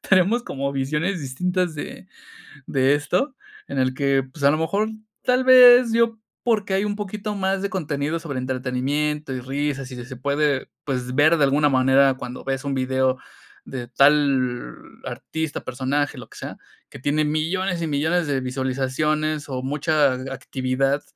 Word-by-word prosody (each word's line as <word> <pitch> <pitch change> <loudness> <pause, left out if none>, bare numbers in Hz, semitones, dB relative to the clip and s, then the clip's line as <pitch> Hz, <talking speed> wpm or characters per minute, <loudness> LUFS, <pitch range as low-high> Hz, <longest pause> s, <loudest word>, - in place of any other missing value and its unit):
tenemos 195 +6 +4
como 140 0 -3
visiones 150 +7 -1
distintas 180 +5 -1
de, - - -8 0.6
de 135 +2 +3
esto, 180 - -1 0.3
en 135 - -2
el 130 0 +1
que, 135 0 +1
pues, 140 +2 -10
a 140 - +6
lo 155 - +1
mejor, 200 +7 0 0.3
tal 250 +1 +2
vez 250 -2 +8
yo 230 -1 +2 0.2
porque 210 -5 +1
hay 195 - +1
un 205 - -2
poquito 210 +1 -4
más 190 0 -1
de 200 - -2
contenido 155 -3 -2
sobre 150 -5 -5
entretenimiento 130 +3 -2
y 130 - -3
risas, 135 0 -3
y - - -7
si 120 -1 -7
se 130 +1 -9
puede, 140 +1 0 0.2
pues, 125 -2 -3
ver 155 +4 +5
de 150 - +3
alguna 145 +2 +3
manera 135 +1 +4
cuando 125 -1 -7
ves 135 +1 -2
un 140 -1 -1
video 130 0 +1 0.5
de 125 -2 -6
tal, 135 -2 +2 0.3
artista, 160 -2 -4
personaje, 135 +2 -1
lo 125 - -11
que - - -15
sea, - - -7 0.3
que - - -10
tiene 150 +3 +1
millones 170 +4 -1
y 165 - -1
millones 160 +4 0
de 140 -2 0
visualizaciones 135 +4 -1
o 130 -1 -4
mucha 145 +1 +2
a - - -3 0.2
actividad, 135 +2 -1
145 Hz, 165 wpm, -23 LUFS, 130-170 Hz, 0.6 s, vez